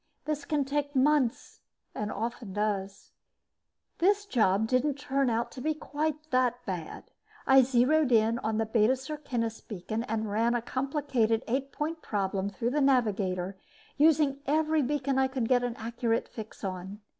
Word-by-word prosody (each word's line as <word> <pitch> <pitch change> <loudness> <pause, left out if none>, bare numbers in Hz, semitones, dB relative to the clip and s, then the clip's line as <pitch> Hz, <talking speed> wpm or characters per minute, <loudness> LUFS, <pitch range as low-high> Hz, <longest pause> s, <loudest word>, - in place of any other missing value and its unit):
This 300 -2 -2
can 295 -3 0
take 285 +1 -2
months, 270 -2 +1 0.3
and 210 0 -3
often 230 -3 -4
does. 200 -2 -3 0.9
This 405 +3 +3
job 220 - +2
didn't 255 +4 +1
turn 275 -2 0
out 235 +1 -1
to 255 - -8
be 310 +3 0
quite 305 +1 -3
that 255 -1 +3
bad. 180 -5 -6 0.3
I 270 0 +7
zeroed 260 +3 +3
on 220 0 +2
the 225 - +1
Beta 220 +2 +3
Circinus 260 -5 -4
beacon 215 +2 -4
and 220 -2 -2
ran 230 +3 +2
a 240 - 0
complicated 260 -4 0
eight 270 +3 -1
point 315 +2 -3
problem 195 -1 -1
through 230 +4 -2
the 295 +2 +1
navigator, 200 -8 +1 0.4
using 295 -2 +3
every 310 +1 +2
beacon 275 0 0
I 265 - +3
could 260 -3 -2
get 245 0 +3
an 245 -1 -2
accurate 230 0 -1
fix 220 -1 -10
on. 190 +2 -5
245 Hz, 155 wpm, -29 LUFS, 220-285 Hz, 0.9 s, I